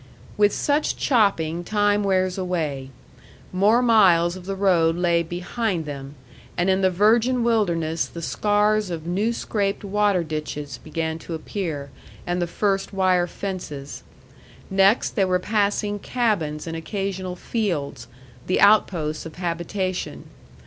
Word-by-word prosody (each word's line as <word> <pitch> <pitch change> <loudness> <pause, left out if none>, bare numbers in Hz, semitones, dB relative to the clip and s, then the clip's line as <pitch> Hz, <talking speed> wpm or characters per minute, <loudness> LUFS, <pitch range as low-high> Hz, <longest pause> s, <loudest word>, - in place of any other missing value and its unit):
With 205 0 +4
such 295 +1 0
chopping 175 - +1
time 205 +1 +2
wears 185 -2 +1
away. 160 -8 -3 0.6
More 210 +6 +4
miles 185 -7 +5
of 185 0 -10
the 195 - -2
road 175 -4 +3
lay 170 -1 +2
behind 175 +2 -3
them, 140 -1 -7 0.4
and 180 +2 +2
in 190 +1 +1
the 190 - +4
virgin 230 +6 +3
wilderness 170 -9 +1
the 170 - -8
scars 210 +2 +1
of 165 -2 -5
new 195 +7 0
scraped 205 -4 -2
water 205 -2 +1
ditches 150 -4 -5
began 160 0 -3
to 165 - -6
appear, 155 -5 -5 0.3
and 175 0 -1
the 175 - 0
first 195 +2 -1
wire 185 -2 +2
fences. 170 -8 -6 0.7
Next, 195 +4 +3
they 200 -4 +1
were 185 -1 +2
passing 205 +1 0
cabins 190 -12 -1
and 165 -1 -5
occasional 190 +1 -4
fields, 170 - -3 0.4
the 185 - +1
outposts 175 -7 +3
of 155 - -12
habitation. 180 +2 -3
185 Hz, 135 wpm, -23 LUFS, 165-205 Hz, 0.7 s, miles